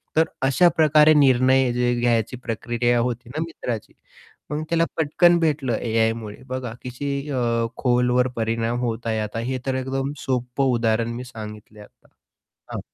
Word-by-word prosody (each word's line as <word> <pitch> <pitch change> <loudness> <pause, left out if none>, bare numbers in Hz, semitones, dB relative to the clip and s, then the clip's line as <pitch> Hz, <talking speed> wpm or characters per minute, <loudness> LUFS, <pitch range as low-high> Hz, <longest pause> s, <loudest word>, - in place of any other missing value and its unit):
तर 160 - +5 0.2
अशा 175 +6 +5
प्रकारे 155 0 +6
निर्णय 130 0 +4
जे 120 0 +1
घ्यायची 120 0 +1
प्रक्रिया 120 0 -1
होती 120 0 -2
ना 155 +5 -4
मित्राची. 120 -9 -6 0.6
मग 150 +1 -2
त्याला 165 0 +2
पटकन 170 +3 +4
भेटलं 145 -7 0
एआयमुळे. 115 -2 -1
बघा 130 -3 -4
कशी 125 +3 -4 0.2
अ, 115 -3 0
खोलवर 125 0 +2
परिणाम 115 +1 -1
होत 115 -1 -3
आहे 110 -1 0
आता. 105 +1 -3
हे 130 +3 -2
तर 135 - -1
एकदम 135 +1 -2
सोपं 125 +1 -1
उदाहरण 115 0 +1
मी 125 - -5
सांगितलंय 105 -3 -10
आता. - - -22 0.7
हां. - - -3
125 Hz, 150 wpm, -23 LUFS, 115-135 Hz, 0.7 s, प्रकारे